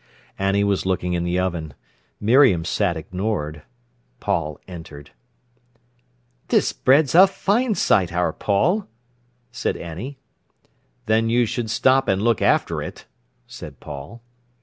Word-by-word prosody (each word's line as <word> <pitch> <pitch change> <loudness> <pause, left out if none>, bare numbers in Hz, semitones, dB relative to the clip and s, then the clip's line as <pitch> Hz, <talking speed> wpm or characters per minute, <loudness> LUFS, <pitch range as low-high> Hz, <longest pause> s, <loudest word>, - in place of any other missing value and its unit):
Annie 100 +1 +1
was 100 -1 +1
looking 90 -1 -1
in 85 -1 -1
the 85 +1 0
oven. 85 -6 -2 0.4
Miriam 110 - +4
sat 90 -2 0
ignored. 80 -3 -3 0.6
Paul 85 -7 -2
entered. 75 -5 -10 1.4
"This - - +2
bread's 140 +1 +3
a 185 +4 +8
fine 215 +4 0
sight, 95 - +2
our 85 -2 0
Paul," 175 - +1 0.6
said 120 - -2
Annie. 95 - -7 0.9
"Then 110 +1 +2
you 120 +1 +3
should 115 0 -3
stop 130 +4 +3
an' 95 0 +1
look 115 -2 +2
after - - +1
it," - - -8 0.4
said - - -11
Paul. 75 +12 -9
100 Hz, 125 wpm, -22 LUFS, 85-120 Hz, 1.4 s, a